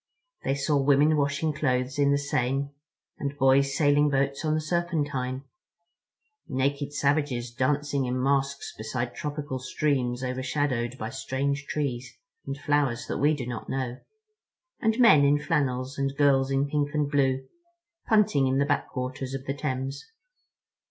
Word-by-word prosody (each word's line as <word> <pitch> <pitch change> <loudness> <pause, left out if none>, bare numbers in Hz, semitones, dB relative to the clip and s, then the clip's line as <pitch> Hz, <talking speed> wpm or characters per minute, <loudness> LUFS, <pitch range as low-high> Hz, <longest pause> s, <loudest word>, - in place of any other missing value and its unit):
They 135 - 0
saw 140 +1 +1
women 145 +3 +4
washing 145 +2 0
clothes 130 -1 -1
in 140 0 +4
the 140 - +3
Seine, 140 0 -1 0.5
and 140 0 -3
boys 135 0 +3
sailing 145 -1 +4
boats 140 0 0
on 155 -1 +1
the - - +1
Serpentine. 150 -6 -2 1.0
Naked 140 +2 -1
savages 140 -4 0
dancing 140 +2 0
in 125 +1 -1
masks 140 +1 0
beside 120 +2 -4
tropical 145 -3 -4
streams 130 -1 -1
overshadowed 130 -1 -1
by 110 -1 -5
strange 140 +2 -2
trees 130 -5 -3 0.3
and 135 - -3
flowers 140 -5 0
that - - -3
we 150 +2 +3
do 130 -4 -5
not 120 -2 -6
know—and 280 - -5
men 190 - +7
in 140 +1 +4
flannels 140 -3 -1
and 135 0 -1
girls 135 -2 +4
in 135 +1 +1
pink 145 0 -1
and 145 -1 0
blue, 135 -2 +1 0.6
punting 210 -11 +3
in 130 +1 +1
the 140 - +3
backwaters 130 -2 -2
of 135 0 -6
the 135 - -1
Thames. 135 -1 -3
140 Hz, 145 wpm, -27 LUFS, 130-145 Hz, 1.0 s, men